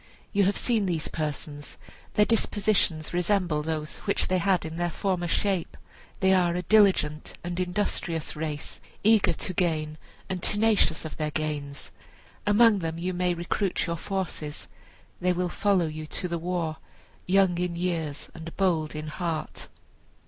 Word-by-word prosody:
You 200 -1 +4
have 200 +1 +1
seen 225 -5 +1
these 165 -4 -1
persons; 150 -1 -5 0.4
their 210 - +5
dispositions 205 -7 +1
resemble 175 -3 +1
those 155 0 -3
which 200 - 0
they 185 0 +2
had 185 -1 +2
in 160 +1 -5
their 175 0 0
former 180 0 -1
shape. 190 0 0 0.4
They 190 0 +5
are 175 -2 +3
a 180 - -1
diligent 185 -7 +3
and 175 +1 -3
industrious 180 -3 -1
race, 150 -1 -5 0.2
eager 220 0 +5
to 185 - -4
gain, 155 -3 0 0.3
and 185 -2 -3
tenacious 210 -7 +3
of 160 - -6
their 155 -1 -1
gains. 150 -2 -4 0.6
Among 210 0 +6
them 165 -2 -3
you 180 +2 -2
may 180 0 +1
recruit 175 +3 -1
your 170 -1 -1
forces. 170 -5 -4 0.5
They 180 0 +2
will 180 0 -1
follow 195 -2 +2
you 155 0 -5
to 180 - -3
the 170 -1 -2
war, 170 -2 -2 0.5
young 185 -2 +4
in 180 -1 -1
years 165 -4 -2
and 165 0 -9
bold 165 -6 +1
in 155 0 -4
heart." 160 0 -4
175 Hz, 155 wpm, -27 LUFS, 155-190 Hz, 0.6 s, Among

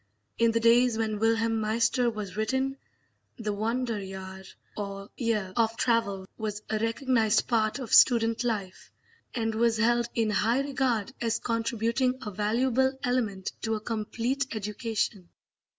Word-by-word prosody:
In 230 0 +5
the 230 0 +1
days 235 0 +4
when 215 -2 -1
Wilhelm 225 0 +2
Meister 230 +3 +2
was 210 -5 -6
written, 265 +5 0 0.6
the 215 -3 -2
Wanderjahr 200 -4 -3 0.3
or 200 -1 -6
year 215 -6 -1
of 225 0 +1
travel 200 -6 0
was 210 -1 -4
a 215 - 0
recognised 225 -1 +1
part 220 -1 +1
of 255 -5 -5
student 230 -1 +5
life, 205 -6 -3 0.4
and 225 -2 -1
was 230 0 +2
held 235 +1 +2
in 225 -2 +1
high 225 +6 +2
regard 265 -4 -1
as 230 -1 +1
contributing 230 +2 0
a 210 - -4
valuable 250 +6 +1
element 225 -7 -1
to 225 -1 -1
a - - -3
complete 230 +5 -2
education. 210 -3 -3
225 Hz, 135 wpm, -28 LUFS, 210-240 Hz, 0.6 s, In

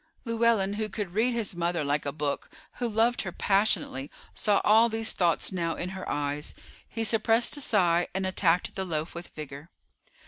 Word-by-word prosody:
Llewellyn, 230 -4 +2
who 215 0 -1
could 195 -3 -4
read 225 +5 +2
his 230 -5 -1
mother 170 -1 -1
like 145 0 -1
a - - -1
book, 145 -1 -3 0.3
who 240 -1 0
loved 230 +3 +2
her 180 - -4
passionately, 195 -9 0 0.2
saw 205 -2 +2
all 225 +2 +6
these 225 0 0
thoughts 170 0 +1
now 170 -3 -1
in 180 - -4
her 190 0 -6
eyes. 145 0 -3 0.3
He 225 - -3
suppressed 225 +3 +2
a - - -4
sigh, 175 -8 +2
and 190 0 -1
attacked 180 -2 +1
the 190 - -3
loaf 160 -3 -3
with 170 +1 -7
vigor. 150 +1 -8
190 Hz, 180 wpm, -28 LUFS, 165-220 Hz, 0.3 s, all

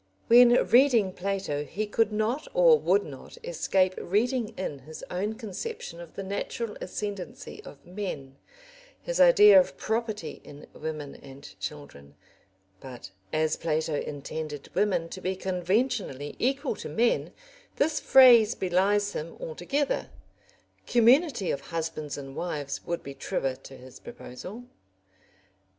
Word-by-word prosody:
When 240 +1 +8 0.2
reading 235 -7 +4
Plato 190 -6 -2
he 200 +9 -4
could 215 +1 +1
not 220 +8 -1
or - - +6
would 410 - +2
not - - -11
escape 190 - +1
reading 235 +5 0
in 150 -7 -4
his 155 +4 -11
own 205 +5 -2
conception 220 - -6
of 170 - -12
the 195 - -5
natural 210 +3 -4
ascendency 200 -5 -6
of 140 - -13
men, 175 -8 -6 0.7
his - - -3
idea 420 -9 +8
of 275 - -1
property 220 -8 -3
in 145 0 -12
women 155 -2 -6
and 135 0 -13 0.2
children. 75 - -8 0.6
But 125 -5 -10 0.2
as 155 0 +1
Plato 160 -1 -1
intended 145 0 -5
women 180 -3 +1
to 185 - -8
be 185 +1 -2
conventionally 185 - -1
equal 270 0 0
to - - -7
men, 235 +1 +1 0.4
this 305 +2 +1
phrase 240 -4 +7
belies 200 +3 +1
him 165 +2 -6
altogether; 225 - -2 0.8
community 245 - +4
of 140 - -3
husbands 160 -3 -4
and 135 -1 -8
wives 145 -5 -4
would 170 0 -3
be 140 - -7
truer 135 -1 -2
to 135 0 -13
his 130 0 -13
proposal. 185 - -9
190 Hz, 130 wpm, -27 LUFS, 150-235 Hz, 0.8 s, When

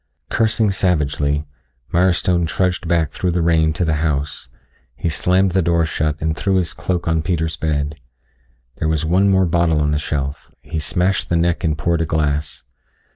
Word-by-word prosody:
Cursing 110 -2 +2
savagely, 75 -5 0 0.5
Milestone 90 -1 +2
trudged 90 +2 -1
back 80 -3 +1
through 90 - -2
the 85 -1 0
rain 80 -1 +3
to 85 +3 -1
the 80 -1 +1
house. 75 -4 -2 0.5
He 65 +7 -2
slammed 90 +4 +2
the 95 +2 +2
door 85 -1 +2
shut 75 -1 -1
and 80 0 -1
threw 95 +4 0
his 90 -2 0
cloak 90 0 -3
on 80 -1 +2
Peter's 80 0 -1
bed. 75 -1 -2 0.8
There 80 - -1
was 80 0 0
one 95 +5 +3
more 95 -1 +4
bottle 85 -2 +2
on 75 0 +1
the 75 - 0
shelf; 70 -1 -4
he 80 - -4
smashed 90 +5 0
the 85 - +1
neck 85 0 0
and 80 -2 0
poured 85 +3 0
a 80 - -1
glass. 75 -1 -1
80 Hz, 180 wpm, -19 LUFS, 75-90 Hz, 0.8 s, more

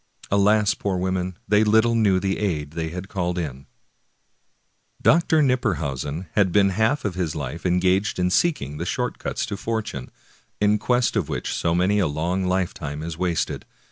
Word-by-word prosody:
Alas, 105 +1 +4
poor 95 -2 -2
women! 95 0 -2
they 105 +1 +4
httle 110 +2 +4
knew 100 -5 +3
the 95 0 -1
aid 75 -8 -2
they 80 0 -3
had 90 +3 -6
called 90 -2 -2
in. 70 -5 -5 1.3
Dr. 160 -1 +4
Knipperhausen 85 - -1
had 95 -3 +2
been 100 +1 +4
half 110 +9 +1
his 90 -5 -2
life 75 +4 -4
engaged 90 +3 +2
in 90 0 +1
seeking 80 - +1
the 85 - -3
short - - -2
cuts - - -2
to - - -4
fortune, 105 - -4 0.5
in 105 +1 +3
quest 125 0 +1
of 90 -8 0
which - - -3
so 85 0 0
many 95 +4 +2
a 95 - +2
long 85 +6 -1
lifetime 85 -5 -2
is 80 0 -5
wasted. 85 -1 -1
95 Hz, 165 wpm, -23 LUFS, 85-105 Hz, 1.3 s, Alas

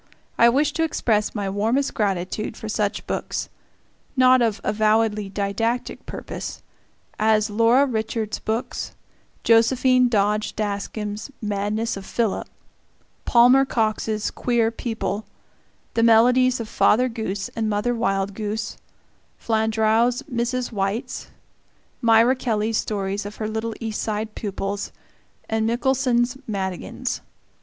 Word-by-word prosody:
I 235 - +6
wish 290 +4 +2
to 325 - 0
express 220 -10 0
my 205 -2 -2
warmest 225 +8 0
gratitude 200 +1 -2
for 220 - -7
such 210 -1 -1
books - - -3 0.7
not 255 0 +6
of 225 -3 +1
avowedly 215 -1 +1
didactic 205 +5 -2
purpose - - -6 0.6
as 215 -1 +3
Laura 230 +6 +4
Richards's 220 -3 -2
books, 225 +2 -3 0.5
Josephine 250 +2 +4
Dodge 210 -1 +1
Daskam's 210 +1 -3
"Madness 210 +2 -2
of 195 - -9
Philip," 225 -4 -1 0.8
Palmer 250 +3 +6
Cox's 220 -3 -1
"Queer 235 -2 +1
People," 220 -3 -3 0.7
the 230 - +1
melodies 245 +3 +5
of 230 - -4
Father 245 +3 +3
Goose 220 -5 -4
and 220 -2 -2
Mother 210 +4 0
Wild 195 -4 0
Goose, 215 +2 -4 0.6
Flandreau's 220 +3 +1
"Mrs. 250 -2 -2
White's," 210 +4 -3 0.7
Myra 230 +2 +5
Kelly's 225 -3 0
stories 200 -1 -2
of 205 +1 -7
her 215 - -3
little 220 +1 -3
East 225 -2 -3
Side 215 0 -3
pupils, 200 -1 -4 0.6
and 220 0 0
Michelson's 245 +1 +1
"Madigans." 190 -4 -3
220 Hz, 115 wpm, -23 LUFS, 210-240 Hz, 0.8 s, I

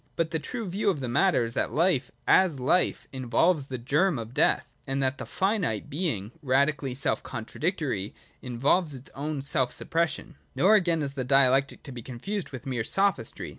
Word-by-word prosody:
But 165 -1 -1
the 160 - -1
true 230 +6 -5
view 200 +3 0
of 175 -7 0
the 130 - -3
matter 125 +3 +3
is 115 - -1
that - - 0
life, 155 -6 +1 0.2
as 175 -7 +4
life, 145 +8 +1
involves 135 +4 +1
the 130 - -4
germ 150 +7 +1
of 115 +1 -7
death, - - +2 0.2
and 135 +1 -1
that 135 +1 0
the - - -6
finite, 185 - -1
being 135 - -2
radically 135 -1 +1
self 140 - -1
contradictory, 125 - -3 0.3
involves 140 +6 +1
its 130 +1 -8
own 145 0 -4
self 130 -2 +1
suppression. 165 0 -2 0.2
Nor, 195 +4 +5
again, 170 -6 +3
is 140 -1 -4
Dialectic 135 0 +3
to 140 - -8
be 125 -2 -7
confounded 165 - -5
with 130 -3 -9
mere 125 -4 -2
Sophistry. 195 - +1
140 Hz, 175 wpm, -27 LUFS, 125-170 Hz, 0.3 s, Nor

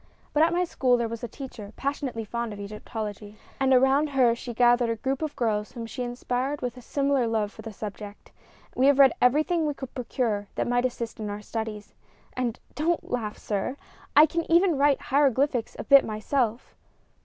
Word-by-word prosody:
But 300 - +3
at 325 +1 +5
my 355 +1 +1
school 255 -7 +2
was 230 -1 -3
a - - -2
teacher 220 -4 -9
passionately 270 -5 -3
fond 235 0 -3
of 205 - -9
Egyptology, 210 0 -6 0.2
and 270 0 +2
around 265 +3 +4
her 255 -4 +4
she 240 +1 -6
gathered 240 0 +3
a 230 - 0
group 265 +5 -2
of 310 -2 -3
girls 215 -3 -1
whom 230 -1 -6
she 250 +3 -6
inspired 250 +3 -2
with 245 -1 -4
a 250 - -11
similar 275 0 +1
love 215 -2 0
for 220 - -12
the 225 0 -7
subject. 205 0 -8 0.4
We 260 +2 +3
have 285 -1 +5
read 270 -3 +7
everything 310 +6 +3
we 295 - -2
could 265 -3 -8
procure 230 -5 -2
that - - -1
might 245 +1 +1
assist 235 -2 -3
us - - -4
in 210 - -3
our 205 +1 -6
studies, 220 -1 -5 0.4
and 245 -2 -2
don't 330 +3 -1
laugh, 220 -4 -2
sir! 210 +6 -3 0.4
I 300 - +9
can 330 +1 -3
even 345 0 +5
write 280 0 +3
hieroglyphics 275 -3 +1
a - - -5
bit 275 +3 +7
myself." 225 +2 -2
245 Hz, 195 wpm, -26 LUFS, 220-275 Hz, 0.4 s, I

